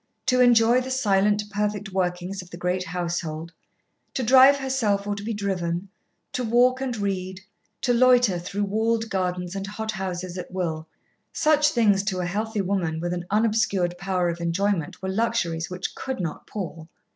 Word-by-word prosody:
To 255 Hz, -1 st, +3 dB
enjoy 240 Hz, 0 st, +5 dB
the 255 Hz, -, -6 dB
silent, 210 Hz, -5 st, +2 dB
perfect 205 Hz, -1 st, -2 dB
workings 185 Hz, +1 st, -2 dB
of 180 Hz, -, -14 dB
the 175 Hz, -, -9 dB
great 180 Hz, +1 st, -1 dB
household, 170 Hz, -2 st, -3 dB, 0.6 s
to 260 Hz, -, 0 dB
drive 265 Hz, +4 st, +7 dB
herself 245 Hz, -7 st, 0 dB
or 205 Hz, -, -1 dB
be 205 Hz, +3 st, -4 dB
driven, 190 Hz, -3 st, -2 dB, 0.4 s
to 250 Hz, -, -1 dB
walk 245 Hz, +3 st, +3 dB
and 255 Hz, -3 st, -2 dB
read, 190 Hz, -2 st, -3 dB, 0.4 s
to 245 Hz, -, +2 dB
loiter 245 Hz, -6 st, +4 dB
through 195 Hz, +4 st, -3 dB
walled 225 Hz, +2 st, 0 dB
gardens 180 Hz, -1 st, -2 dB
and 195 Hz, 0 st, -4 dB
hothouses 190 Hz, -4 st, -4 dB
at -, -, -7 dB
will, 165 Hz, -4 st, -3 dB, 0.4 s
such 300 Hz, -1 st, +3 dB
things 215 Hz, -8 st, +3 dB
to 195 Hz, -3 st, -1 dB
a 180 Hz, -, -1 dB
healthy 210 Hz, +3 st, -2 dB
woman 180 Hz, -4 st, -1 dB
with 175 Hz, +1 st, -2 dB
an 175 Hz, 0 st, -5 dB
unobscured 205 Hz, -4 st, +1 dB
power 185 Hz, -2 st, 0 dB
of 170 Hz, 0 st, -4 dB
enjoyment 170 Hz, 0 st, -1 dB
were 190 Hz, -, -2 dB
luxuries 190 Hz, -6 st, -1 dB
which 180 Hz, 0 st, -4 dB
could 265 Hz, -3 st, -5 dB
not 165 Hz, -4 st, -4 dB
pall. 165 Hz, -5 st, -6 dB
195 Hz, 165 wpm, -25 LUFS, 180-225 Hz, 0.6 s, drive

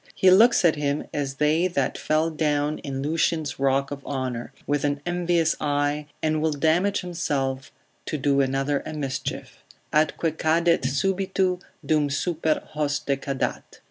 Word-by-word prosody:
He 185 Hz, -, +5 dB
looks 220 Hz, +1 st, +6 dB
at 160 Hz, -2 st, +4 dB
him 145 Hz, 0 st, -1 dB
as 140 Hz, -2 st, -2 dB
they 155 Hz, +5 st, +2 dB
that 140 Hz, -7 st, -1 dB
fell 155 Hz, +2 st, 0 dB
down 150 Hz, -1 st, 0 dB
in 135 Hz, -1 st, -4 dB
Lucian's 155 Hz, -2 st, 0 dB
rock 135 Hz, +1 st, +1 dB
of 140 Hz, -1 st, -6 dB
honour, 130 Hz, -4 st, -4 dB
with 145 Hz, -1 st, 0 dB
an 145 Hz, 0 st, 0 dB
envious 175 Hz, -2 st, +1 dB
eye, 145 Hz, 0 st, 0 dB, 0.2 s
and 155 Hz, -1 st, +1 dB
will 155 Hz, -1 st, +1 dB
damage 165 Hz, +7 st, +2 dB
himself, 140 Hz, -7 st, -2 dB, 0.4 s
to 155 Hz, -, -2 dB
do 140 Hz, 0 st, +2 dB
another 135 Hz, +1 st, 0 dB
a 155 Hz, -, -6 dB
mischief: 135 Hz, -2 st, -4 dB, 0.3 s
Atque 155 Hz, +1 st, +1 dB
cadet 165 Hz, -2 st, +2 dB
subito, 185 Hz, +4 st, 0 dB, 0.3 s
dum 150 Hz, -2 st, +2 dB
super 155 Hz, +2 st, 0 dB
hoste 145 Hz, -2 st, 0 dB
cadat. 135 Hz, -1 st, -3 dB
150 Hz, 145 wpm, -25 LUFS, 140-165 Hz, 0.4 s, looks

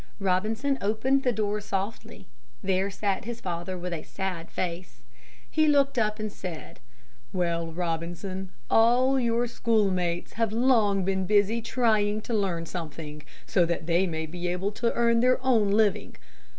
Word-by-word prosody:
Robinson 220 Hz, +8 st, 0 dB
opened 220 Hz, +7 st, +1 dB
the 255 Hz, -, +2 dB
door 210 Hz, -1 st, -1 dB
softly. 205 Hz, +2 st, -4 dB, 0.4 s
There 190 Hz, 0 st, +1 dB
sat 200 Hz, 0 st, -2 dB
his 235 Hz, 0 st, -5 dB
father 180 Hz, 0 st, -4 dB
with 180 Hz, 0 st, -4 dB
a 160 Hz, -, -4 dB
sad 180 Hz, -3 st, -5 dB
face. 180 Hz, 0 st, -5 dB, 0.4 s
He 310 Hz, 0 st, +2 dB
looked 280 Hz, -3 st, +3 dB
up 215 Hz, -1 st, +1 dB
and 215 Hz, -1 st, -4 dB
said, 175 Hz, -4 st, -8 dB, 0.5 s
"Well, 170 Hz, -2 st, -1 dB
Robinson, 175 Hz, +3 st, -4 dB, 0.2 s
all 250 Hz, -, +4 dB
your 235 Hz, -1 st, +1 dB
schoolmates 195 Hz, -7 st, 0 dB
have 225 Hz, -2 st, 0 dB
long 220 Hz, -5 st, +3 dB
been 190 Hz, -1 st, 0 dB
busy 210 Hz, +3 st, +3 dB
trying 215 Hz, -3 st, +1 dB
to 235 Hz, -, -5 dB
learn 185 Hz, -6 st, 0 dB
something, 155 Hz, -3 st, -6 dB, 0.2 s
so 180 Hz, -, +3 dB
that 170 Hz, -1 st, -2 dB
they 175 Hz, +3 st, +2 dB
may 160 Hz, -2 st, -3 dB
be 175 Hz, +2 st, -5 dB
able 180 Hz, +3 st, -1 dB
to 230 Hz, +2 st, 0 dB
earn 235 Hz, -1 st, +3 dB
their 255 Hz, +2 st, +4 dB
own 225 Hz, -6 st, +4 dB
living. 205 Hz, -1 st, +1 dB
200 Hz, 150 wpm, -27 LUFS, 180-230 Hz, 0.5 s, all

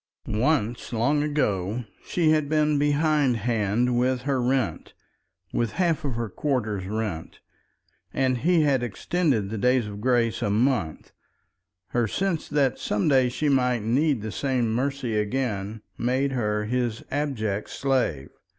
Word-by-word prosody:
Once, 120 Hz, 0 st, 0 dB
long 125 Hz, +6 st, +1 dB
ago, 120 Hz, -7 st, -1 dB, 0.2 s
she 165 Hz, -3 st, +1 dB
had 155 Hz, -2 st, +1 dB
been 150 Hz, -1 st, +2 dB
behind 145 Hz, -3 st, +2 dB
hand 115 Hz, +2 st, 0 dB
with 125 Hz, 0 st, +1 dB
her 135 Hz, -2 st, 0 dB
rent, 130 Hz, -2 st, -1 dB, 0.6 s
with 115 Hz, -3 st, 0 dB
half 170 Hz, -3 st, +1 dB
of 135 Hz, -5 st, -2 dB
her 115 Hz, 0 st, -2 dB
quarter's 105 Hz, -5 st, -2 dB
rent, 105 Hz, -6 st, -4 dB, 0.7 s
and 130 Hz, -2 st, +1 dB
he 170 Hz, +4 st, +3 dB
had 140 Hz, -4 st, +2 dB
extended 120 Hz, -, 0 dB
the 110 Hz, -, -3 dB
days 125 Hz, +1 st, +3 dB
of 105 Hz, 0 st, -7 dB
grace 120 Hz, -2 st, +1 dB
a -, -, 0 dB
month; 105 Hz, -, 0 dB, 0.8 s
her 120 Hz, -2 st, +1 dB
sense 185 Hz, -, -1 dB
that 140 Hz, -5 st, +1 dB
some 105 Hz, -, 0 dB
day 130 Hz, -4 st, +4 dB
she 150 Hz, +5 st, -2 dB
might 125 Hz, -5 st, +2 dB
need 130 Hz, +1 st, +1 dB
the 110 Hz, -, -4 dB
same 125 Hz, -4 st, 0 dB
mercy 130 Hz, -1 st, -1 dB
again 105 Hz, -2 st, -2 dB, 0.2 s
made 130 Hz, +3 st, +1 dB
her 105 Hz, -4 st, -1 dB
his 120 Hz, -1 st, -1 dB
abject 110 Hz, -8 st, -2 dB
slave. 130 Hz, -, -1 dB
125 Hz, 140 wpm, -25 LUFS, 110-140 Hz, 0.8 s, day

